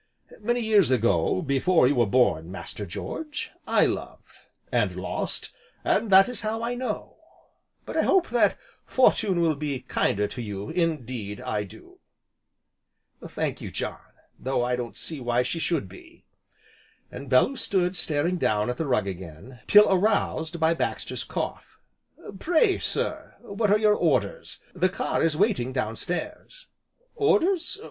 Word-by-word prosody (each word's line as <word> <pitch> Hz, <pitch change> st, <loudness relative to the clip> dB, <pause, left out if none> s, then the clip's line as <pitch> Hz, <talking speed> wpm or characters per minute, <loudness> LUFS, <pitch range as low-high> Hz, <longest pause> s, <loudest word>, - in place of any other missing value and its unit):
Many 240 Hz, +3 st, 0 dB
years 215 Hz, -, +4 dB
ago, 115 Hz, -, +2 dB
before 140 Hz, +2 st, +3 dB
you 140 Hz, -, +3 dB
were 120 Hz, -5 st, +2 dB
born, 90 Hz, -8 st, +2 dB
Master 100 Hz, +1 st, -6 dB
George, 300 Hz, -, -5 dB, 0.2 s
I -, -, +4 dB
loved -, -, -5 dB, 0.3 s
and -, -, +1 dB
lost, -, -, -2 dB, 0.3 s
and 230 Hz, -, +1 dB
that 195 Hz, 0 st, +7 dB
is 250 Hz, -4 st, -6 dB
how 220 Hz, +1 st, -2 dB
I 235 Hz, +1 st, -1 dB
know. 250 Hz, +1 st, -4 dB, 0.7 s
But -, -, -7 dB
I -, -, +3 dB
hope 375 Hz, -3 st, +2 dB
that 240 Hz, -, +3 dB, 0.3 s
Fortune 210 Hz, -8 st, +2 dB
will 165 Hz, -2 st, +3 dB
be 140 Hz, -3 st, -4 dB
kinder 105 Hz, -5 st, 0 dB
to 125 Hz, -, -6 dB
you, 100 Hz, -2 st, -5 dB
indeed 130 Hz, -, -2 dB
I 105 Hz, -1 st, -2 dB
do." 110 Hz, +3 st, -15 dB, 1.3 s
"Thank -, -, -3 dB
you, -, -, -5 dB
John, -, -, -4 dB, 0.4 s
though 130 Hz, -1 st, -1 dB
I 125 Hz, 0 st, 0 dB
don't 120 Hz, -1 st, -6 dB
see 160 Hz, -3 st, -5 dB
why 120 Hz, 0 st, +1 dB
she 145 Hz, +7 st, -3 dB
should 155 Hz, -, -1 dB
be." 95 Hz, -, -16 dB, 0.9 s
And 135 Hz, +1 st, -8 dB
Bellew 130 Hz, -, +4 dB
stood 185 Hz, -6 st, 0 dB
staring 160 Hz, +2 st, 0 dB
down 105 Hz, -6 st, +1 dB
at 125 Hz, -, -6 dB
the 160 Hz, -, -2 dB
rug 125 Hz, -6 st, +1 dB
again, 95 Hz, +6 st, -8 dB
till 210 Hz, 0 st, +8 dB
aroused 180 Hz, -4 st, +1 dB
by 160 Hz, +1 st, +3 dB
Baxter's -, -, -3 dB
cough: -, -, -5 dB, 0.6 s
"Pray 355 Hz, -, +3 dB
sir, -, -, -2 dB
what 200 Hz, +1 st, -1 dB
are 205 Hz, -, +5 dB
your 215 Hz, -1 st, +4 dB
orders, -, -, 0 dB
the 185 Hz, 0 st, +2 dB
car 185 Hz, -, -2 dB
is 160 Hz, -2 st, +1 dB
waiting 190 Hz, -, +1 dB
downstairs?" 180 Hz, -, -4 dB, 0.5 s
"Orders? 405 Hz, -4 st, +2 dB
160 Hz, 150 wpm, -26 LUFS, -, 1.3 s, till